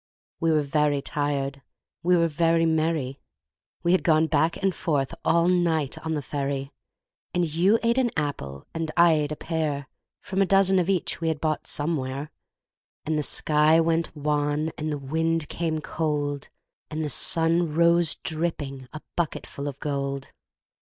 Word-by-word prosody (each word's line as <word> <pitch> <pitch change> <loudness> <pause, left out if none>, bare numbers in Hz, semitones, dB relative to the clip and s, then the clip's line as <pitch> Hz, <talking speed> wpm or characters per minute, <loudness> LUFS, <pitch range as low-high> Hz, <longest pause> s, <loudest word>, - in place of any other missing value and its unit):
We 165 -1 +2
were 155 -1 +2
very 145 0 +1
tired, 140 -1 -2 0.4
we 180 +1 +3
were 170 0 +3
very 165 +1 +2
merry 155 -4 0 0.6
We 170 - +2
had 185 - +3
gone 160 -1 +3
back 160 +1 +1
and 195 -1 0
forth 145 -6 -1
all 170 +1 +3
night 170 -6 +1
on 160 0 -3
the 145 - -3
ferry, 140 0 -3 0.6
And 175 -1 +2
you 175 +7 +3
ate 235 +2 +2
an 250 -2 +2
apple, 70 - -4
and 165 -1 -3
I 170 -1 +6
ate 150 -1 0
a - - -2
pear, 150 -4 -3 0.3
From 190 +1 -2
a - - +4
dozen 195 -1 +4
of 180 +1 0
each 185 -3 -1
we 165 - -1
had 160 -2 -1
bought 155 -1 -2
somewhere; 145 -2 -2 0.7
And 155 - -1
the 150 - +1
sky 150 +2 +3
went 165 0 0
wan, 150 +1 0
and 155 0 -3
the 150 - -2
wind 160 +3 -1
came 160 -2 -2
cold, 145 -3 -2 0.4
And 155 0 -3
the - - -1
sun 165 +2 +4
rose 170 0 +4
dripping, 150 -5 -1
a 155 - -8
bucketful 150 -3 -3
of 140 -1 -6
gold. 140 -2 -3
155 Hz, 165 wpm, -25 LUFS, 145-165 Hz, 0.7 s, I